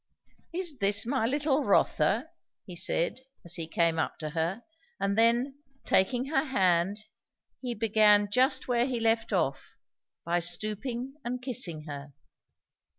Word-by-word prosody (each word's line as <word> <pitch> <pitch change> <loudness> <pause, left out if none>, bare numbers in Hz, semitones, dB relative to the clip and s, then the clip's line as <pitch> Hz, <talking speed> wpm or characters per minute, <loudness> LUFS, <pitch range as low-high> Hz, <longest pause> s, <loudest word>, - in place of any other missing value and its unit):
"Is 335 -5 -3
this 200 +1 +3
my 245 -2 0
little 290 +2 +1
Rotha?" 205 - +2 0.3
he 180 - -9
said 170 +7 0 0.2
as 170 - -5
he 165 -3 -3
came 165 0 +1
up - - -2
to 155 -1 -5
her; 170 +7 -2 0.4
and 200 0 0
then, 240 +5 +2 0.3
taking 240 +7 +2
her 275 -1 +1
hand, 190 - +1 0.6
he 245 -2 -3
began 210 -1 +4
just 255 +5 +2
where 245 0 +2
he 250 -3 -2
left 225 0 +1
off, 160 -9 -1 0.5
by 170 +1 +1
stooping 215 - -3
and 245 +1 -3
kissing 235 - -3
her. 145 -1 -8
215 Hz, 140 wpm, -29 LUFS, 175-250 Hz, 0.6 s, began